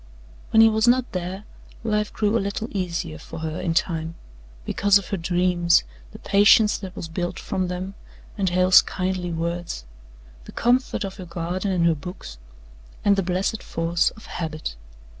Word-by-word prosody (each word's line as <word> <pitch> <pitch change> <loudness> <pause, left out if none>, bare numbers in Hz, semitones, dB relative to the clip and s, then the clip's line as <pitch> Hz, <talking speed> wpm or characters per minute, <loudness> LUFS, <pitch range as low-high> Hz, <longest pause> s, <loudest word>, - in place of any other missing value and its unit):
When 220 - +6
he 225 - +8
was 220 +1 +2
not 250 +1 +3
there, 185 +2 -4 0.4
life 210 -2 0
grew 210 0 0
a 230 - +2
little 200 +3 -3
easier 170 -4 -3
for 160 - -9
her 160 0 -3
in 165 -2 -1
time, 165 -2 -1 0.5
because 200 0 +4
of 200 - -7
her 200 - -1
dreams, 175 0 +2 0.3
the - - -10
patience 210 +1 +5
that 190 -1 -8
was 165 - -5
built 175 +2 -3
from 185 -2 -2
them 180 +2 -4 0.4
and 195 -3 0
Hale's 180 +1 +6
kindly 185 -1 -3
words, 170 - -3 0.6
the - - -11
comfort 245 0 +1
of 195 0 -6
her 185 - -7
garden 175 +3 -3
and 175 -2 +2
her 170 - +5
books, 145 - -9 0.7
and 200 -1 +5
the 195 - +1
blessed 185 +3 -1
force 170 +1 0
of 215 - -13
habit. 155 - -5
185 Hz, 170 wpm, -24 LUFS, 170-200 Hz, 0.7 s, he